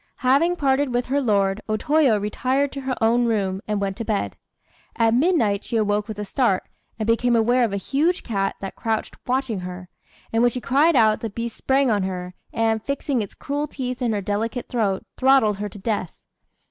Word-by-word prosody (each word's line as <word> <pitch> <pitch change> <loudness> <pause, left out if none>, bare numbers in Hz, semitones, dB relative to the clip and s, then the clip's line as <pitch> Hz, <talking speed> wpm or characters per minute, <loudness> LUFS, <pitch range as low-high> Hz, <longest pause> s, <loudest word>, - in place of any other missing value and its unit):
Having 300 +8 +4
parted 275 -3 +1
with 245 0 0
her 280 +3 0
lord, 200 -4 +1
O 215 - +1
Toyo 285 -2 +3
retired 260 +7 0
to 275 - -6
her 260 -1 -2
own 235 +2 +3
room 195 -4 0
and 210 -1 -1
went 195 -1 -2
to 230 - -3
bed. 215 -2 -2 0.6
At 225 -1 +3
midnight 240 - +2
she - - -4
awoke 210 -1 +1
with 215 -2 -6
a 210 - -4
start, 200 -3 +1 0.3
and 220 - -2
became 235 +2 +2
aware 240 +2 +3
of 225 - +1
a 200 - -1
huge 305 - 0
cat 195 -4 -1
that 195 - -6
crouched 225 -1 -2
watching 255 -5 0
her; 180 0 -7 0.4
and 225 - +3
when 245 - +5
she 250 - -4
cried 285 +8 +3
out, 220 -3 +4
the 225 - -4
beast 230 +2 -5
sprang 270 -1 +2
on 205 -2 +2
her, 180 -1 -4 0.2
and, 225 -1 +1
fixing 280 0 -1
its 200 - -7
cruel 290 +1 -3
teeth 255 -3 -5
in 240 -2 +1
her 205 -2 -1
delicate 220 +5 -3
throat, 205 -6 0
throttled 260 -6 +4
her 210 0 -3
to 205 - -11
death. 200 -4 -3
230 Hz, 205 wpm, -23 LUFS, 205-265 Hz, 0.6 s, when